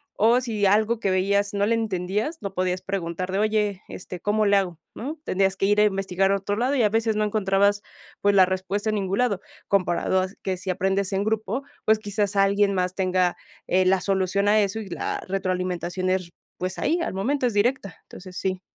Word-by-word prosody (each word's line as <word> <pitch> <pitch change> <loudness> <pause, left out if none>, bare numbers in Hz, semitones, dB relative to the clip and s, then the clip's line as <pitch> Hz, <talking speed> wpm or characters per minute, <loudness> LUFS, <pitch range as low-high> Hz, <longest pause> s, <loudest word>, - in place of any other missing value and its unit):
o, 230 +4 +4
si 215 -5 0
algo 215 +3 +2
que 200 - 0
veías 200 +2 +1
no 200 0 +2
le 230 - +2
entendías, 215 - -1
no 200 -2 -5
podías 185 0 -1
preguntar 185 -1 -3
de: 195 - 0
"Oye, 210 -2 0
este, 180 0 -8
¿cómo 210 +4 +1
le 200 0 +4
hago?", 180 -4 -2
¿no?, 290 +7 -5
tendrías 195 0 +1
que 195 - +1
ir 205 +1 +3
a - - +6
investigar 195 -1 +1
a - - +3
otro 200 +1 -2
lado 250 +6 0
y 250 - +3
a 210 - +4
veces 225 0 +1
no 215 - +1
encontrabas, 200 -1 +2 0.4
pues, 205 0 +3
la 190 -1 +7
respuesta 190 +3 -2
en - - -1
ningún 195 -1 -1
lado, 235 -6 +1 0.3
comparado 185 -1 +1
a 185 - -1 0.2
que 190 -1 -1
si 190 +1 -7
aprendes 190 +1 0
en 195 +1 +1
grupo 220 +4 -1 0.2
pues 220 0 +4
quizás 205 -1 -2
alguien 200 0 +3
más 180 0 0
tenga, 185 -2 +1 0.3
eh, 185 +1 +3
la 190 0 +3
solución 195 +1 0
a 215 +1 +5
eso 200 +1 -1
y 210 -3 -7
la 175 - -3
retroalimentación 185 -1 -2
es, 185 -2 -1 0.3
pues 185 0 -3
ahí 340 - +1
al 265 - -3
momento, 255 +6 0
es 230 - -3
directa, 205 -2 0
entonces 180 0 -11
sí. 185 -1 -2
195 Hz, 210 wpm, -24 LUFS, 185-210 Hz, 0.4 s, la